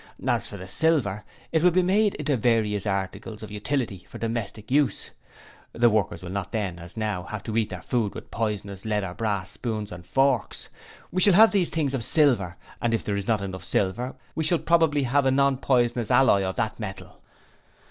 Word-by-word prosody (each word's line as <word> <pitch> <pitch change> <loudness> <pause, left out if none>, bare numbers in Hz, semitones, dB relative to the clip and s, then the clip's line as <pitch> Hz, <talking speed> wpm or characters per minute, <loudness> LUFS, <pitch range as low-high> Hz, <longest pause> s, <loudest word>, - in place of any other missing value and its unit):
As - - +1
for 100 - -8
the 95 -1 -9
silver, 115 - +1 0.3
it 160 - +2
will 180 - +6
be 180 +1 +2
made 205 +3 +2
into 150 -1 0
various 110 -4 +1
articles 100 +3 -3
of 105 - -8
utility 105 -3 -3
for - - -9
domestic 115 -1 -4
use. 145 0 +1 0.6
The 120 0 +4
workers 100 -5 0
will 90 - -6
not 100 -2 -4
then, 95 -6 -2
as 85 +5 -11
now, 105 -4 -1
have 110 -1 -6
to 110 -2 -4
eat 115 -2 +1
their - - -7
food 115 -5 -1
with - - -9
poisonous 100 -4 -3
lead 105 -2 -1
or 90 -2 -5
brass 100 -3 -2
spoons 110 -4 -4
and 90 0 -8
forks, 135 +3 0 0.4
we 185 - 0
shall 200 +1 +6
have 220 +3 +8
these 190 -4 +2
things 150 -4 -1
of 130 -4 -1
silver 120 - +3 0.3
and 115 -1 +1
if 115 - -3
there 100 - -2
is 100 -1 -3
not 110 -3 +1
enough 95 -1 -6
silver 120 +7 -1 0.2
we 160 - -2
shall 165 +3 +3
probably 160 -4 +2
have 135 +2 +2
a - - +5
non 140 0 +3
poisonous 120 -4 +1
alloy 125 -7 +5
of 95 -1 -2
that 110 - -2
metal.' 100 -3 -8
115 Hz, 205 wpm, -25 LUFS, 100-140 Hz, 0.6 s, have